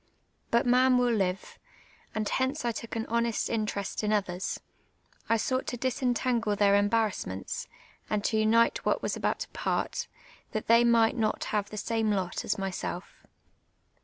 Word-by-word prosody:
Ikit 235 +1 +3
man 250 +1 +5
will 245 -1 +3
live; 190 -3 -2 0.6
and 215 -1 -1
hence 260 +3 -1
I 235 - +2
took 230 +1 -6
an 225 0 -2
honest 235 0 0
interest 215 -3 -2
in 210 - +1
others; 190 -3 -1 0.7
I 230 - +4
sought 255 +4 -1
to 245 - -3
disentangle 245 -3 0
their 200 -1 +4
emban*assments, 205 - 0 0.4
and 210 -1 0
to 220 - 0
unite 225 +2 +3
what - - 0
was - - -1
about - - -1
to - - -3 0.2
])art, - - -1 0.5
that 215 - -2
tlu'V 235 +1 +6
might 230 -1 +4
not 215 -2 0
have 205 -1 0
the 215 - -7
same 225 +1 0
lot 190 -4 -1
as - - -1
myself. 190 -2 -5
220 Hz, 160 wpm, -29 LUFS, 205-235 Hz, 0.7 s, tlu'V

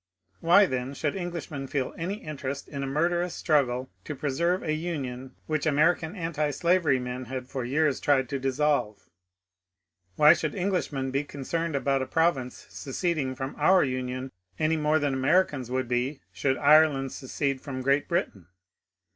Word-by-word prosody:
Why, 180 +5 +6
then, 130 -3 -3
should 145 +1 -2
Englishmen 170 -6 -5
feel 130 -1 -2
any 180 +5 -3
interest 140 -2 -5
in 140 -2 -6
a 135 - -2
murder 170 +5 +1
ous 180 -1 -3
struggle 130 -4 +1 0.2
to 150 - -5
preserve 170 +7 0
a 155 - -1
Union 135 -6 -4
which 155 -1 -1
American 160 +4 +2
antislavery 165 -2 +1
men 125 0 -5
had 130 +1 -5
for 130 -1 -4
years 140 +3 +1
tried 135 -3 +2
to 140 -2 -2
dissolve? 135 -5 0 1.1
Why 150 +6 +8
should 155 -2 -3
English 190 -2 -1
men 135 -2 -3
be 140 +2 0
concerned 155 +3 -3
about 135 -1 +1
a 130 - -3
province 160 -7 0
seceding 145 -2 -2
from 130 +1 -5
our 185 +5 +5
Union 130 0 -3 0.3
any 155 +1 +2
more 155 0 +2
than 145 -3 0
Americans 135 -1 +1
would 130 0 -1
be 125 +4 -1
should 135 -1 0
Ireland 145 -2 +4
secede 135 0 -3
from 130 -2 -5
Great 140 +2 +2
Britain 100 - -2
140 Hz, 160 wpm, -27 LUFS, 130-160 Hz, 1.1 s, Why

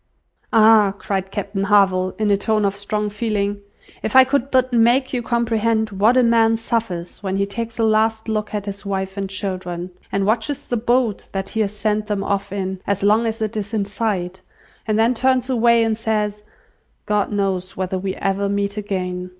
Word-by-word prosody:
"Ah!" 215 -3 +5
cried 190 0 -3
Captain 200 0 -3
Harville, 190 -2 +3
in 215 -1 +1
a - - +5
tone 215 +1 0
of 200 0 0
strong 210 +1 -2
feeling, 205 -1 -2 0.4
"if 220 - -3
I 260 - +10
could 270 0 0
but 255 -1 +2
make 240 +4 +3
you 250 - 0
comprehend 230 -2 0
what 210 +6 +3
a 255 - +5
man 225 -1 +4
suffers 220 -8 -3
when 190 -2 -2
he 200 0 +1
takes 230 +3 -5
a 230 - +1
last 220 0 +2
look 215 -1 -2
at 205 -1 -3
his 200 0 -6
wife 190 -1 -3
and 195 -1 -3
children, 185 -2 -4 0.2
and 195 0 0
watches 230 +7 -1
the 245 - -2
boat 240 -1 0
that 195 0 -3
he 220 - -4
has 210 -1 -1
sent 210 0 -1
them 205 -2 -1
off 200 0 -2
in, 190 -1 -3
as 200 -1 -1
long 215 +3 +3
as 225 0 -2
it 215 +1 -3
is 210 +1 -3
in 205 -2 0
sight, 190 -3 -3 0.5
and 215 -1 +1
then 225 +3 +3
turns 260 +1 +1
away 235 -1 +4
and 220 -1 -1
says, 210 -2 -1 0.6
'God 210 0 0
knows 190 -3 -2
whether 185 0 -2
we 190 0 -3
ever 195 +1 -1
meet 200 +1 -1
again! 185 -3 -3
210 Hz, 195 wpm, -20 LUFS, 195-225 Hz, 0.6 s, I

